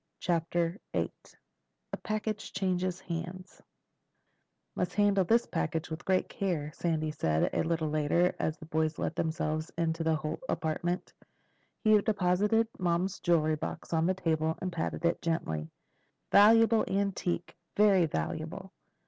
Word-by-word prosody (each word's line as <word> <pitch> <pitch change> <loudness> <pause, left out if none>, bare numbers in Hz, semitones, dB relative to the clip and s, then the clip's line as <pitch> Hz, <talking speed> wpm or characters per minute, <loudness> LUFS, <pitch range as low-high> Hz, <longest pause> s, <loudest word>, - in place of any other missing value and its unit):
CHAPTER 170 +1 0
VIII - - 0 0.8
A - - -1
PACKAGE 215 0 -3
CHANGES 185 -1 -1
HANDS 175 +2 -6 1.1
"Must 180 0 -2
handle 205 -2 +4
this 230 +6 +3 0.4
with 160 +2 -6
great 190 -1 +2
care," 165 -7 -2
Sandy 155 -3 -1
said 80 - 0
a - - +1
little 160 -1 0
later 155 +4 +2
as 155 +1 -1
the 160 - -11
boys 155 0 0
let - - -2
themselves 155 0 -2
into 165 0 0
the 160 0 +2
Holt 155 0 -4
apartment. 175 +2 -2 0.7
He 215 -1 +6
deposited 210 +2 +2
Mom's 180 +1 0
jewel 155 -2 +2
box 150 - -5
on 165 +2 +2
a 190 - +1
table 160 -3 0
and 185 -1 -4
patted 170 +1 -2
it 170 - +1
gently. 80 - -2 0.6
"Valuable 225 +2 +6
antique—very 195 0 +1
valuable. 80 - -4
170 Hz, 130 wpm, -30 LUFS, 160-190 Hz, 1.1 s, He